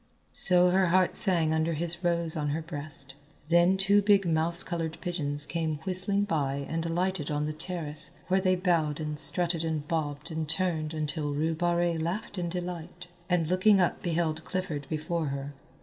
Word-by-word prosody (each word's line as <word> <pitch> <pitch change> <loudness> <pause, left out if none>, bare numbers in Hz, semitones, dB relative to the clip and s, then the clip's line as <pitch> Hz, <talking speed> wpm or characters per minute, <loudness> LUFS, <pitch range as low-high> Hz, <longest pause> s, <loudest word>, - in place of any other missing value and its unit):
So 180 -1 +4
her 190 0 +3
heart 185 +1 +2
sang 170 -6 +3
under 160 +1 0
his 170 +3 -3
rose 170 -2 0
on 150 -2 -2
her 155 +3 -2
breast. 145 -4 -6 0.4
Then 175 +2 +4
two 200 +1 +4
big 200 -1 +3
mouse 165 +1 +2
coloured 165 -2 -4
pigeons 145 -5 -1
came 160 -2 -2
whistling 190 +2 +3
by 140 -7 -1
and 165 0 -2
alighted 175 -2 -1
on 150 0 -1
the 155 - -3
terrace, 155 -2 -1 0.2
where 190 +1 +2
they 185 -1 +2
bowed 170 -5 0
and 150 -1 -4
strutted 165 +3 +5
and 155 -2 -3
bobbed 150 0 -3
and 160 -1 -4
turned 160 -2 -1
until 150 -1 -3
Rue 160 +3 0
Barrée 175 0 0
laughed 185 +4 -4
in 175 -1 -2
delight, 180 0 -6 0.2
and 175 -2 +2
looking 185 +4 +4
up 180 - +1
beheld 165 -3 -1
Clifford 170 -7 -4
before 160 +1 -2
her. 140 +1 -5
165 Hz, 175 wpm, -28 LUFS, 155-180 Hz, 0.4 s, strutted